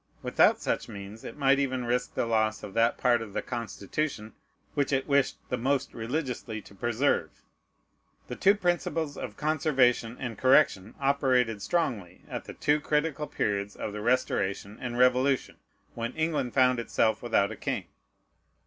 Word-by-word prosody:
Without -, -, +4 dB
such -, -, -2 dB
means 100 Hz, +1 st, -9 dB
it -, -, -8 dB
might 135 Hz, -1 st, +4 dB
even 130 Hz, -3 st, -1 dB
risk 125 Hz, +1 st, -1 dB
the -, -, 0 dB
loss 110 Hz, -2 st, +1 dB
of 100 Hz, -2 st, -7 dB
that 115 Hz, +1 st, +2 dB
part 120 Hz, -2 st, +3 dB
of 110 Hz, -3 st, -8 dB
the -, -, -1 dB
Constitution 115 Hz, 0 st, -4 dB, 0.4 s
which 145 Hz, -1 st, 0 dB
it 135 Hz, -1 st, 0 dB
wished 140 Hz, -2 st, +2 dB
the 125 Hz, -, -1 dB
most 135 Hz, +2 st, 0 dB
religiously 120 Hz, -2 st, -3 dB
to 100 Hz, -, -15 dB
preserve. 120 Hz, -, 0 dB, 1.0 s
The 125 Hz, -, -5 dB
two 200 Hz, +8 st, +4 dB
principles 175 Hz, -5 st, -1 dB
of 105 Hz, -5 st, -7 dB
conservation 135 Hz, -6 st, +2 dB
and 120 Hz, -4 st, -5 dB
correction 130 Hz, -7 st, +3 dB
operated 130 Hz, -6 st, +2 dB
strongly 115 Hz, -, -2 dB
at -, -, -6 dB
the -, -, -9 dB
two 150 Hz, +1 st, +2 dB
critical 150 Hz, 0 st, -1 dB
periods 100 Hz, 0 st, -2 dB
of 105 Hz, -, -5 dB
the 105 Hz, -, -5 dB
Restoration 105 Hz, -4 st, 0 dB
and 120 Hz, -1 st, -4 dB
Revolution, 125 Hz, +2 st, +2 dB, 0.4 s
when 115 Hz, +1 st, -4 dB
England 160 Hz, -6 st, -1 dB
found 125 Hz, -2 st, +4 dB
itself 115 Hz, -1 st, +1 dB
without 110 Hz, -4 st, +1 dB
a -, -, -5 dB
king. -, -, -3 dB
125 Hz, 155 wpm, -28 LUFS, 110-140 Hz, 1.0 s, Without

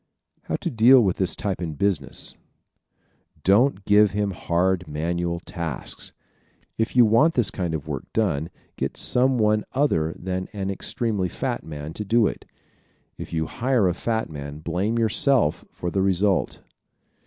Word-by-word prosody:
How -, -, -2 dB
to -, -, -3 dB
Deal 120 Hz, +3 st, +7 dB
with 95 Hz, -3 st, 0 dB
this 95 Hz, -, 0 dB
Type 100 Hz, -3 st, -3 dB
in 80 Hz, -3 st, -4 dB
Business 75 Hz, -4 st, -2 dB, 1.1 s
¶ -, -, -34 dB
Don't 100 Hz, +1 st, +3 dB
give 105 Hz, 0 st, +5 dB
him 105 Hz, -1 st, 0 dB
hard 90 Hz, 0 st, 0 dB
manual 85 Hz, +3 st, -2 dB
tasks. 85 Hz, -6 st, -6 dB, 0.6 s
If 110 Hz, +2 st, -2 dB
you 125 Hz, -2 st, +7 dB
want 115 Hz, +10 st, +4 dB
this 110 Hz, -6 st, +3 dB
kind 90 Hz, -5 st, -2 dB
of 75 Hz, -2 st, -6 dB
work 70 Hz, -4 st, -5 dB
done 85 Hz, -8 st, 0 dB, 0.3 s
get -, -, -3 dB
some 130 Hz, +1 st, +3 dB
one 105 Hz, -1 st, +2 dB
other 80 Hz, -, +1 dB
than 95 Hz, 0 st, -4 dB
an 100 Hz, -1 st, -3 dB
extremely 100 Hz, -1 st, -2 dB
fat -, -, -3 dB
man 75 Hz, 0 st, -7 dB
to 105 Hz, -, -4 dB
do 115 Hz, +2 st, +3 dB
it. -, -, -3 dB, 0.7 s
If -, -, -7 dB
you 80 Hz, -1 st, -1 dB
hire 120 Hz, +2 st, +1 dB
a 90 Hz, -, +1 dB
fat 110 Hz, +4 st, -2 dB
man 70 Hz, -1 st, -7 dB
blame 90 Hz, +9 st, -2 dB
yourself 115 Hz, -, +2 dB
for 85 Hz, -, -5 dB
the 95 Hz, -, 0 dB
result. 95 Hz, +1 st, +1 dB
95 Hz, 160 wpm, -24 LUFS, 85-110 Hz, 1.1 s, Deal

